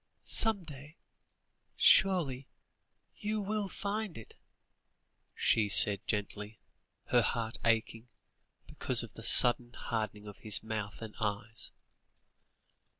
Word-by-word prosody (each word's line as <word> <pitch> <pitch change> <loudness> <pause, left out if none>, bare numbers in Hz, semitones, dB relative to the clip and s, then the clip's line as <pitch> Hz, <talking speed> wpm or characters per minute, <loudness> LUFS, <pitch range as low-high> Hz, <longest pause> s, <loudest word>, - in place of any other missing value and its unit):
"Some 220 -4 +1
day 150 +1 -13 0.8
surely 155 -9 +2 0.7
you 215 +1 -3
will 210 0 -3
find 200 0 -5
it?" 115 - -12 1.0
she 105 -2 +2
said 100 -1 +6
gently, 105 0 -5 0.5
her 120 - +3
heart 115 -1 -2
aching, 115 +1 -1 0.6
because - - -3
of - - -11
the - - -12
sudden 120 0 +4
hardening 110 -3 -5
of 105 -1 -12
his 110 -1 -1
mouth 110 -1 -6
and 110 -2 -9
eyes. 105 +1 +2
115 Hz, 105 wpm, -31 LUFS, 105-175 Hz, 1.0 s, said